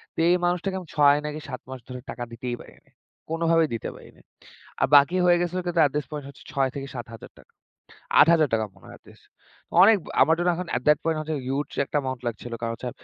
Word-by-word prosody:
তো -, -, -6 dB
এই 175 Hz, -, +5 dB
মানুষটাকে 180 Hz, +2 st, -1 dB
আমি 180 Hz, -, -11 dB
৬ 145 Hz, -1 st, +5 dB
নাকি 150 Hz, 0 st, -4 dB
৭ 130 Hz, -, -6 dB
মাস 130 Hz, 0 st, -7 dB
ধরে 125 Hz, -1 st, -7 dB
টাকা 120 Hz, -, -6 dB
দিতেই 120 Hz, +1 st, -4 dB
পারিনি। -, -, -18 dB, 0.4 s
কোনভাবেই 165 Hz, -1 st, +2 dB
দিতে 115 Hz, -, -5 dB
পারি -, -, -14 dB
নাই। -, -, -22 dB, 0.6 s
আর -, -, +4 dB
বাকি 145 Hz, +5 st, +6 dB
হয়ে 175 Hz, -1 st, +5 dB
গেছিলো 175 Hz, +1 st, -2 dB
কিন্তু 175 Hz, -1 st, -1 dB
অ্যাট 145 Hz, -3 st, +4 dB
দিস 150 Hz, -, -1 dB
পয়েন্ট 150 Hz, -2 st, -6 dB
হচ্ছে 140 Hz, -, -15 dB
৳৬০০০ 135 Hz, -2 st, 0 dB
থেকে 140 Hz, -1 st, -5 dB
৳৭০০০ 115 Hz, -2 st, -10 dB, 0.7 s
৳৮০০০ 150 Hz, -9 st, +4 dB
মনে 95 Hz, -, -19 dB
হয় -, -, -12 dB
এটলিস্ট। -, -, -20 dB, 0.6 s
অনেক 215 Hz, +2 st, +7 dB
ব -, -, -18 dB, 0.2 s
আমার 160 Hz, -, +5 dB
জন্য 175 Hz, +1 st, +1 dB
এখন 180 Hz, +1 st, -5 dB
অ্যাট 125 Hz, -, -1 dB
দ্যাট 150 Hz, -1 st, +5 dB
পয়েন্ট 160 Hz, -1 st, 0 dB
হচ্ছে 155 Hz, 0 st, -3 dB
হিউজ 140 Hz, +3 st, -2 dB, 0.2 s
একটা 150 Hz, -, -2 dB
অ্যামাউন্ট 130 Hz, -2 st, -4 dB
লাগছিল। 120 Hz, +1 st, -5 dB
কারণ 115 Hz, -1 st, -2 dB
হচ্ছে 125 Hz, -, -6 dB
145 Hz, 215 wpm, -25 LUFS, 130-165 Hz, 0.7 s, অনেক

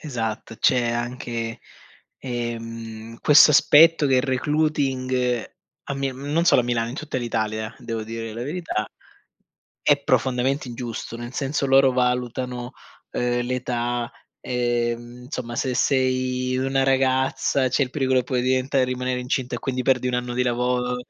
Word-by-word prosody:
Esatto, 115 Hz, -5 st, -4 dB
c'è 120 Hz, +1 st, +2 dB
anche, 120 Hz, -1 st, -4 dB, 0.6 s
ehm, 115 Hz, -2 st, -6 dB
questo 150 Hz, +1 st, +7 dB
aspetto 155 Hz, +2 st, +6 dB
che 135 Hz, -1 st, +3 dB
il 125 Hz, -, +3 dB
recruiting, 130 Hz, -3 st, 0 dB, 0.3 s
a 140 Hz, -, -4 dB
mi 135 Hz, 0 st, -1 dB
non 145 Hz, +6 st, -1 dB
solo 150 Hz, -, +5 dB
a -, -, -6 dB
Milano, 115 Hz, -1 st, 0 dB
in 120 Hz, -, -6 dB
tutta 155 Hz, -4 st, -3 dB
l'Italia, 110 Hz, -2 st, -2 dB
devo 115 Hz, -2 st, -4 dB
dire 115 Hz, 0 st, -6 dB
la 115 Hz, +2 st, -5 dB
verità, 150 Hz, -6 st, -3 dB, 1.0 s
è -, -, +3 dB
profondamente 130 Hz, +2 st, +1 dB
ingiusto, 120 Hz, -1 st, -6 dB
nel 120 Hz, +1 st, -7 dB
senso 140 Hz, +1 st, -1 dB
loro 135 Hz, 0 st, +5 dB
valutano, 125 Hz, 0 st, -1 dB, 0.4 s
ehm, 120 Hz, 0 st, 0 dB
l'età, 120 Hz, -1 st, -2 dB, 0.3 s
ehm, 120 Hz, 0 st, -2 dB
insomma, 125 Hz, -4 st, -5 dB
se 130 Hz, -, 0 dB
sei 130 Hz, -1 st, +1 dB
una 135 Hz, +1 st, +1 dB
ragazza, 130 Hz, 0 st, +2 dB
c'è 130 Hz, -, +1 dB
il 125 Hz, -, -10 dB
pericolo 130 Hz, -2 st, +1 dB
che -, -, -7 dB
puoi 125 Hz, -1 st, -1 dB
diventare 130 Hz, +1 st, +1 dB
rimanere 125 Hz, 0 st, -2 dB
incinta 125 Hz, 0 st, -2 dB
e -, -, -5 dB
quindi 130 Hz, -1 st, -2 dB
perdi 125 Hz, -1 st, +2 dB
1 125 Hz, -, -1 dB
anno 125 Hz, 0 st, -2 dB
di 125 Hz, -, +1 dB
lavoro, 125 Hz, 0 st, 0 dB
125 Hz, 150 wpm, -23 LUFS, 120-130 Hz, 1.0 s, questo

